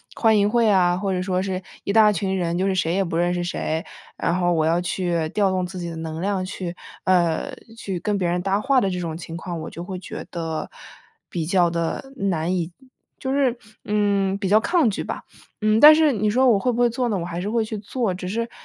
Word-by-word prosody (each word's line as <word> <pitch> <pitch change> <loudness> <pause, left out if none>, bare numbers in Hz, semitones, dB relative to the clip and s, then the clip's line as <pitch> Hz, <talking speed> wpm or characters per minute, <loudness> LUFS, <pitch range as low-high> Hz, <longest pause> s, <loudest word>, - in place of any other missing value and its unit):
欢 220 -2 +4
迎 205 +1 +3
会 235 -1 +3
啊， 180 -3 +4
或 195 0 -1
者 180 - -1
说 185 0 -1
是 190 -1 -2 0.2
一 200 - -1
大 215 -1 +6
群 190 0 -1
人， 170 -1 -1
就 190 - +1
是 195 - +1
谁 175 -2 0
也 195 - +2
不 170 - -4
认 175 +1 +2
识 175 0 -1
谁， 160 -2 -2 0.3
然 170 - 0
后 175 -1 +2
我 160 -1 +2
要 170 +2 +2
去 175 -2 -1
调 200 +2 +1
动 185 -1 0
自 185 0 -8
己 175 - -4
的 165 - -6
能 160 0 -5
量 195 +1 -1
去 185 -2 -5 0.3
呃， 180 - +1 0.2
去 190 -5 -4
跟 205 +3 -1
别 180 -2 0
人 175 +1 0
搭 195 +2 +1
话 265 +1 +3
的 195 - +1
这 180 -1 -3
种 165 -2 -4
情 165 -1 -7
况， 170 -1 -5
我 155 - -6
就 170 - -8
会 185 0 -6
觉 175 - -7
得 165 -2 -4 0.6
比 165 -2 -3
较 175 0 +3
地 170 -1 -2
难 185 -6 -1
以 175 -1 -2 0.5
就 265 - -3
是， 265 -3 +2 0.3
嗯， 200 -2 +1
比 200 -1 -2
较 215 +2 +6
抗 325 0 +2
拒 200 - -3
吧。 - - -5 0.4
嗯， 215 +1 +3
但 305 +1 +11
是 315 -2 +4
你 215 0 0
说 255 +5 +3
我 210 -4 +4
会 250 - +1
不 235 - -3
会 240 - +5
做 245 +2 -1
呢， 205 - 0
我 170 - -3
还 175 0 -4
是 200 - -3
会 230 0 +1
去 215 -1 -5
做， 205 0 -2
只 180 0 -6
是， 230 +3 -2
190 Hz, 265 characters per minute, -23 LUFS, 175-210 Hz, 0.6 s, 但